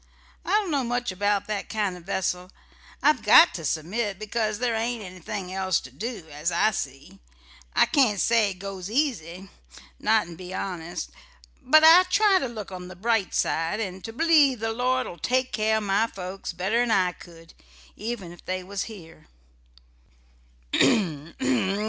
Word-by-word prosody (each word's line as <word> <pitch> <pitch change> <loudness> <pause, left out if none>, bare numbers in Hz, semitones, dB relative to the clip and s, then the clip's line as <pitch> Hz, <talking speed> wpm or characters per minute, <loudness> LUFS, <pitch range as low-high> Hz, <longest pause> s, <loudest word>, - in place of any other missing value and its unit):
I - - -8
don't 415 -4 +2
know 280 -3 +1
much 245 -2 -2
about 205 +1 0
that 210 -2 -4
kind 205 -4 -1
o' - - -10
vessel. 180 0 -3 0.5
I've 290 -4 +4
got 210 -4 +7
to 170 -1 -6
submit 195 +7 -2
because 215 0 -2
there 240 0 0
ain't 230 0 -2
anything 185 +1 -7
else 190 -2 +1
to 130 - -12
do, 210 - -6
as 150 +4 -2
I 175 +6 +3
see. 135 -8 -6 0.6
I - - +6
can't 255 -10 +2
say 230 -1 +3
it 195 - -6
goes 190 0 -7
easy 195 - -2 0.5
not'n' 210 -6 +1
be 185 0 -8
honest; 170 - -5 0.5
but 310 +4 +5
I 330 +3 +9
try 400 -1 +4
to 270 - -2
look 215 -5 -8
on 180 -1 -7
the 185 - -10
bright 220 +1 0
side, 165 +6 0
and 190 -3 -5
to 225 - -6
believe 290 -2 +4
the 225 0 -2
Lord'll 250 -5 -1
take 255 - 0
care 220 0 +2
of 215 - -2
my 205 +3 +2
folks 190 -1 -6
better'n 215 +8 0
I 185 -4 +3
could, 165 -2 -15 0.4
even 215 -5 -5
if 175 - -14
they 185 0 -3
was 195 +1 -4
here." 165 -8 -12
205 Hz, 160 wpm, -25 LUFS, 180-235 Hz, 0.6 s, I